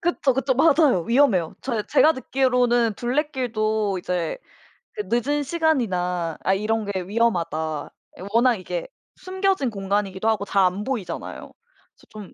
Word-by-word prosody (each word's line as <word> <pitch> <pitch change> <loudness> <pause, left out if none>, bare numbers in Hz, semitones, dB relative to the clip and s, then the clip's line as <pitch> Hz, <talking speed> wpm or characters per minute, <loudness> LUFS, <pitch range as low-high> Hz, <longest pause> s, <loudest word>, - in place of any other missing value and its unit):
그쵸, 330 -6 +1
그쵸. 265 +1 0
맞아요. 280 - +4
위험해요. 230 - +2
저 230 -5 -2
제가 305 +5 +4
듣기로는 250 -4 +1
둘레길도 230 -6 -1
이제 180 - -3 0.6
그 210 - -4
'늦은 270 +7 0
시간이나 190 - 0
아 190 - +2
이런 220 +3 0
게 200 -2 -3
위험하다.' 175 -7 -1 0.4
워낙 240 +1 +4
이게 - - -5 0.3
숨겨진 375 -6 -1
공간이기도 200 0 -2
하고 220 -2 +1
잘 195 -1 +2
안 185 +3 -1
보이잖아요. 240 -6 -5 0.4
그래서 - - -24
좀 210 -3 -11
230 Hz, 310 characters per minute, -23 LUFS, 195-270 Hz, 0.6 s, 맞아요